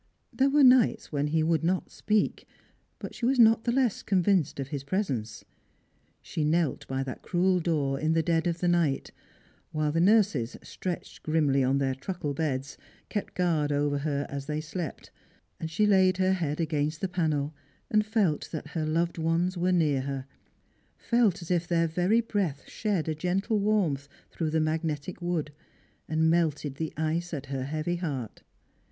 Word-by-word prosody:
There 270 +1 +3
were 290 +1 +4
nights 255 -3 +5
when 145 -1 0
he 160 +1 +1
would 165 0 +1
not 180 +2 0
speak, 215 -1 0 0.5
but - - -7
she 235 - -2
was 265 +1 +2
not 225 -1 +5
the 240 - +2
less 250 -4 +1
convinced 180 -6 +1
of 135 -1 -4
his 140 -2 -4
presence. 140 - -3 0.8
She 155 - -3
knelt 155 -2 0
by 135 0 -2
that 130 -1 -7
cruei 180 0 +1
door 145 -5 0
ia 155 - +1
the 160 0 +2
dead 165 0 +1
of 170 -1 -2
the 180 - +1
night 170 -6 +1 0.3
— - - -34
while 155 -1 0
the 165 +2 +1
nurses, 195 - +3
stretched 180 -2 -6
grimly 150 -4 +2
on 130 +2 +2
their 135 -1 +1
truckle 145 +2 -4
beds, 140 -3 -3 0.3
kept 205 - -4
guai'd 160 -5 +1
over 145 0 +1
her 145 -1 -1
aa 140 - -4
they 150 +2 -3
slept 160 +1 -6 0.2
— - - -40
and 160 - -4
laid 190 -3 +4
her 190 0 +3
head 160 -5 -2
against 155 -1 -1
the 190 - 0
panel, 155 -5 -1 0.4
and 215 0 +4
felt 210 -8 0
that 150 -2 -5
her 155 -1 -2
loved 170 +2 0
ones 165 +3 +1
were 180 +1 +1
near 155 -6 +2
her; 135 -1 -4 0.7
felt 225 -8 +1
as 170 - -6
if 175 -1 +1
their 170 -1 +2
very 180 +8 +2
breath 195 -11 -2
shed 200 -7 -1
a 160 - 0
gentle 190 +7 0
warmth 190 -10 +1 0.2
through 160 -2 -2
the 160 +1 +1
magnetic 155 +1 -2
wood, 170 -4 -2 0.6
and 160 +1 +3
melted 150 -4 0
the 160 0 -3
ice 165 +2 -1
at 140 -2 -6
her 130 -1 -2
heavy 155 +4 -2
heaii. 135 - -4
160 Hz, 180 wpm, -28 LUFS, 145-185 Hz, 0.8 s, nights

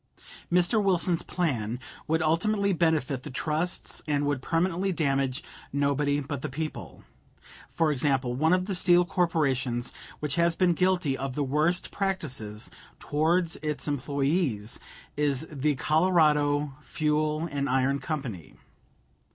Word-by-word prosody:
Mr. 180 +5 +4
Wilson's 180 -3 +2
plan 125 -10 -2 0.3
would 160 +1 +1
ultimately 200 +5 +2
benefit 160 -6 +1
the - - -8
trusts 155 +6 -2
and 145 -1 +1
would 145 -2 -1
permanently 175 +5 0
damage 135 -4 0 0.3
nobody 145 +1 +1
but 145 -1 -5
the - - -4
people. 130 - -6 0.7
For 160 -2 +1
example, 135 -2 +1
one 155 +6 +2
of 185 0 +3
the 195 - -3
steel 180 -1 +4
corporations 135 -9 0 0.3
which 150 0 -2
has 170 0 +3
been 180 -1 +3
guilty 180 -5 +1
of 135 -1 -4
the 145 - 0
worst 155 +6 +1
practices 135 - -3 0.3
towards 165 +3 +1
its 150 -1 -2
employees 140 - 0 0.4
is 145 -1 +1
the 150 0 0
Colorado 150 -2 +2
Fuel 155 0 0
and 140 -1 -1
Iron 135 +2 +2
Company. 135 - -5
150 Hz, 125 wpm, -27 LUFS, 135-170 Hz, 0.7 s, Mr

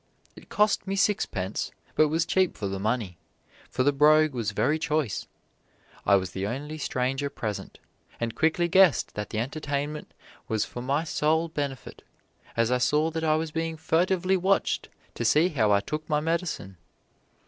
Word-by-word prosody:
It - - -15
cost 210 -2 +2
me 195 - -1
sixpence, 115 - 0 0.2
but 155 - +4
was 165 +2 0
cheap 185 0 +1
for 100 - -3
the 95 0 -4
money, 105 -5 -2 0.5
for 130 - 0
the 145 - +4
brogue 155 +1 +5
was 115 -4 -2
very 150 +9 +1
choice. 150 -8 -1 0.8
I 100 - +6
was 95 -2 0
the 95 +2 -3
only 145 +7 -5
stranger 135 +1 -1
present, 110 -7 -5 0.4
and 115 -1 -2
quickly 160 +4 +1
guessed 185 -3 +4
that 105 -1 -5
the - - -4
entertainment 145 +4 -3 0.4
was 110 -1 0
for 120 - -7
my 140 +5 0
sole 160 +1 +1
benefit, 140 -5 -5 0.6
as 115 +1 +2
I 125 - +2
saw 150 +5 +2
that 160 0 -3
I 155 -1 +3
was 160 0 -2
being 165 0 -3
furtively 185 +4 +1
watched 190 +2 +1 0.2
to - - -4
see 150 +10 +4
how 115 - +2
I 100 0 +4
took 155 +6 -5
my 150 -1 +2
medicine. 160 - -2
150 Hz, 170 wpm, -27 LUFS, 115-160 Hz, 0.8 s, I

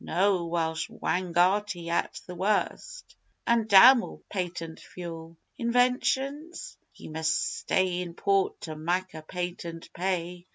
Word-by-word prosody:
No! 185 0 +1
Welsh 165 -1 -1
Wangarti 180 0 0
at 170 - -1
the 180 - -8
worst 215 - -2 0.3
an' 235 -2 +2
damn 235 +5 +9
all - - -9
patent 175 -4 -4
fuel!) 165 -2 -9 0.2
Inventions? 265 +6 0 0.2
Ye - - -11
must 160 0 -1
stay 185 -1 +1
in 170 -2 -6
port 195 0 +1
to 155 -2 -6
mak' 175 +4 -1
a 160 - -7
patent 170 0 -6
pay. 180 -1 -3
180 Hz, 125 wpm, -28 LUFS, 170-205 Hz, 0.3 s, damn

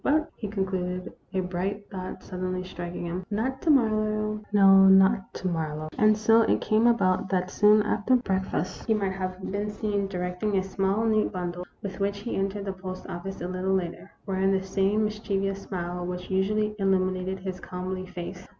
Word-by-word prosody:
" - - -36
But," 310 +2 +2
he 215 - -5
concluded, 185 -2 -3 0.2
a 190 - 0
bright 190 +3 -3
thought 185 -1 -6
suddenly 185 0 -3
striking 175 -1 -6
him, 175 +2 -3
"not 255 +6 -2
to 330 - 0
Marlowe 215 -5 +2
no, 195 -1 +7
not 190 +1 +5
to 185 - -3
Marlowe." 155 -3 -2
And 215 0 +4
so 225 +1 +5
it - - +2
came 220 +2 +3
about 190 -6 +2
that 185 -1 0
soon 210 0 +5
after 245 +6 +2
breakfast 190 -6 -1
he 220 - +3
might 200 -2 0
have 185 -1 -4
been 205 +1 -2
seen 205 -1 -1
directing 180 +2 -2
a 190 - +2
small, 195 +3 0
neat 215 -1 +2
bundle, 180 -1 -4 0.2
with 195 -1 -5
which 200 0 0
he 210 +4 -4
entered 195 +1 -2
the 195 - -2
post 185 0 -7
office 190 +2 -6
a 175 - -2
little 185 +1 0
later, 175 -2 -3 0.2
wearing 195 0 +1
the 190 -1 +1
same 195 +2 +1
mischievous 195 -2 -2
smile 175 -1 -4
which 180 +1 -5
usually 210 +3 +1
illuminated 190 -1 +1
his 185 -1 -5
comely 185 +1 -5
face. 180 0 -7
195 Hz, 185 wpm, -27 LUFS, 185-210 Hz, 0.2 s, no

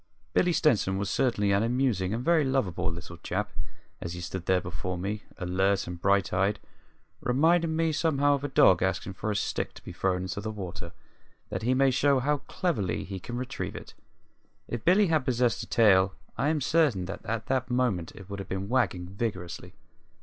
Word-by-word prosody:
Billy 180 - +3
Stenson 115 - +2
was 100 -1 -2
certainly 105 -5 +1
an 100 +1 +3
amusing 115 -6 +1
and 115 +3 -3
very 170 -2 +4
lovable 130 -12 0
little 85 0 -8
chap - - -3 0.5
as 85 - -4
he 90 - -6
stood 85 +1 -5
there 95 -1 +4
before 90 +1 -4
me, 100 +4 -3 0.2
alert 95 +2 +1
and 90 -1 -7
bright 100 0 +2
eyed, 100 +3 +1 0.6
reminding 160 +5 +3
me 165 0 +2
somehow 145 -2 +2
of 140 0 -1
a - - 0
dog 95 -9 +5
asking 95 +1 -1
for 110 - -4
a 105 - 0
stick - - -2
to - - -13
be - - -8
thrown 90 -1 0
into 95 +2 -4
the 110 - -4
water, 90 -5 -6 0.6
that 95 - -3
he 125 +3 +2
may 135 0 +4
show 140 +2 +3
how 145 +3 +1
cleverly 105 - -1
he 95 -1 -6
can 120 +6 -6
retrieve 125 0 -4
it. - - -9 0.7
If 120 -2 -4
Billy 190 +4 +5
had 160 -5 +2
possessed 120 -2 +1
a 115 - -7
tail 95 -4 +4 0.2
I 140 - 0
am 155 -2 0
certain 140 - +2
that 95 +2 -7
at 110 0 -3
that 130 -1 -1
moment 120 -10 0
it 95 - -11
would 100 0 -6
have 100 - -7
been 95 +1 -3
wagging 120 -9 +1
vigorously. 95 -2 -5
105 Hz, 195 wpm, -28 LUFS, 95-135 Hz, 0.7 s, dog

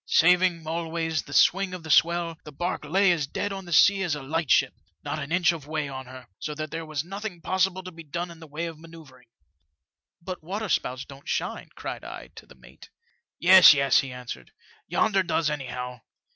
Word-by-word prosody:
Saving, 180 -1 +4
always, 160 -1 -2
the - - -14
swing 190 +4 +3
of 175 - -9
the 160 - -4
swell, 170 0 +3
the 150 - -10
harque 175 -3 -2
lay 190 +5 +3
as 155 -5 0
dead 200 +7 -3
on 195 -1 -7
the 175 - -10
sea 195 +4 +5
as 175 -6 0
a 145 - -7
light 160 +2 -2
ship, - - +4 0.3
not - - -3
an 140 - -6
inch 175 0 +3
of 155 -4 -8
way 155 -1 -2
on 130 -1 -7
her; 130 -1 -11
so 150 - -5
that 155 0 -5
there 165 -1 -5
was 155 -2 -3
nothing 195 0 -6
possible 185 +2 0
to 185 - -8
be 165 -1 -11
done 170 +3 -5
in 165 - -13
the 160 - -12
way 155 +3 -4
of 165 -2 -7
manoeuvring. 155 -7 -15 0.3
" 75 -2 -52
* - - -67
But 185 0 -6
waterspouts 175 -8 -2
don't 140 0 -12
shine,' - - -3
cried - - -6
I, - - -9
to - - -13
the - - -16
mate. - - -17 0.5
"*Yes, 185 -3 +9
yes,' 140 -1 +4
he 135 - -3
answered; 125 - -8 0.4
'yonder 195 -3 +2
does, 165 -3 0
anyhow. 125 -4 -5
165 Hz, 215 wpm, -26 LUFS, 145-180 Hz, 0.5 s, Yes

